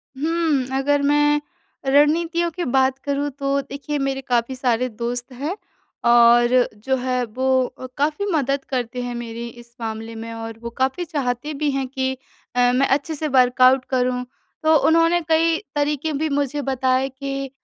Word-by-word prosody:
हुँ, 310 Hz, -2 st, 0 dB
अगर 285 Hz, +1 st, +2 dB
मैं 295 Hz, +1 st, +3 dB, 0.5 s
रणनीतियों 325 Hz, +5 st, +3 dB
की 355 Hz, +2 st, -4 dB
बात 265 Hz, +1 st, +2 dB
करूँ 285 Hz, 0 st, -1 dB
तो 275 Hz, 0 st, +1 dB
देखिए 280 Hz, +2 st, -5 dB
मेरे 270 Hz, -1 st, -1 dB
काफ़ी 250 Hz, -1 st, 0 dB
सारे 250 Hz, -1 st, +1 dB
दोस्त 240 Hz, +2 st, -4 dB
हैं। 290 Hz, +9 st, -3 dB, 0.5 s
और 240 Hz, +1 st, +5 dB, 0.2 s
जो 265 Hz, +1 st, +1 dB
है 250 Hz, 0 st, -1 dB
वो 250 Hz, +4 st, -4 dB, 0.3 s
अ, 255 Hz, -, -6 dB
काफ़ी 300 Hz, +7 st, 0 dB
मदद 275 Hz, -3 st, 0 dB
करते 250 Hz, -1 st, -2 dB
हैं 245 Hz, 0 st, -4 dB
मेरी 235 Hz, 0 st, -6 dB
इस 235 Hz, 0 st, -18 dB
मामले 225 Hz, 0 st, -5 dB
में 225 Hz, +1 st, -7 dB
और 225 Hz, 0 st, -7 dB
वो 235 Hz, -, -4 dB
काफ़ी 265 Hz, +7 st, 0 dB
चाहते 285 Hz, -1 st, -2 dB
भी 295 Hz, +1 st, -1 dB
हैं 270 Hz, -1 st, -2 dB
कि 260 Hz, 0 st, -2 dB, 0.4 s
अ, 245 Hz, 0 st, +4 dB
मैं 275 Hz, +2 st, +3 dB
अच्छे 285 Hz, +4 st, 0 dB
से 310 Hz, +1 st, -2 dB
वर्कआउट 255 Hz, -1 st, +4 dB
करूँ, 250 Hz, -1 st, 0 dB, 0.4 s
तो 315 Hz, 0 st, +5 dB
उन्होंने 330 Hz, +2 st, +4 dB
कई 325 Hz, 0 st, +3 dB, 0.2 s
तरीक़े 295 Hz, +1 st, 0 dB
भी 310 Hz, +2 st, -1 dB
मुझे 285 Hz, 0 st, -1 dB
बताए 265 Hz, 0 st, +1 dB
कि 275 Hz, 0 st, -5 dB
270 Hz, 165 wpm, -22 LUFS, 250-295 Hz, 0.5 s, और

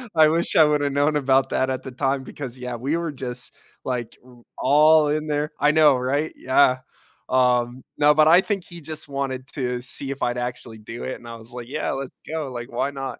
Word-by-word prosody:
I 155 Hz, -1 st, +7 dB
wish 165 Hz, +2 st, 0 dB
I 160 Hz, -, +8 dB
woulda 145 Hz, -1 st, +1 dB
known 145 Hz, +2 st, +2 dB
about 135 Hz, -2 st, +2 dB
that 130 Hz, -, 0 dB
at 130 Hz, -, -3 dB
the 130 Hz, -, -7 dB
time 135 Hz, +1 st, -1 dB
because, 130 Hz, -2 st, -7 dB
yeah, 125 Hz, -1 st, -4 dB
we 135 Hz, +8 st, -1 dB
were 170 Hz, -2 st, -3 dB
just, 125 Hz, -2 st, -5 dB, 0.3 s
like, 125 Hz, -3 st, -3 dB
w 125 Hz, -1 st, -19 dB
all 150 Hz, +2 st, +5 dB
in 150 Hz, +1 st, -1 dB
there. 150 Hz, 0 st, -1 dB
I 145 Hz, +1 st, +4 dB
know, 150 Hz, -4 st, +5 dB
right? 140 Hz, +5 st, -1 dB
Yeah. 130 Hz, 0 st, +3 dB, 0.5 s
Um, 125 Hz, -1 st, +1 dB
no, 150 Hz, 0 st, +5 dB
but 155 Hz, +1 st, +5 dB
I 175 Hz, +3 st, +7 dB
think 200 Hz, -3 st, -2 dB
he 170 Hz, -1 st, -11 dB
just 155 Hz, 0 st, -7 dB
wanted 135 Hz, -1 st, -4 dB
to 125 Hz, -3 st, -2 dB
see 135 Hz, +2 st, -3 dB
if 140 Hz, -, -7 dB
I'd 120 Hz, 0 st, 0 dB
actually 120 Hz, -2 st, -5 dB
do 115 Hz, +2 st, -8 dB
it, 130 Hz, -, -4 dB
and 120 Hz, -, -13 dB
I 115 Hz, -, -7 dB
was 115 Hz, +2 st, -13 dB
like, 120 Hz, -1 st, -7 dB
"Yeah, 150 Hz, +3 st, -2 dB
let's 135 Hz, -1 st, -5 dB
go, 155 Hz, -4 st, -4 dB
like, 120 Hz, +1 st, -7 dB
why 140 Hz, -, -1 dB
not?" 135 Hz, -1 st, -6 dB
135 Hz, 225 wpm, -23 LUFS, 125-150 Hz, 0.5 s, I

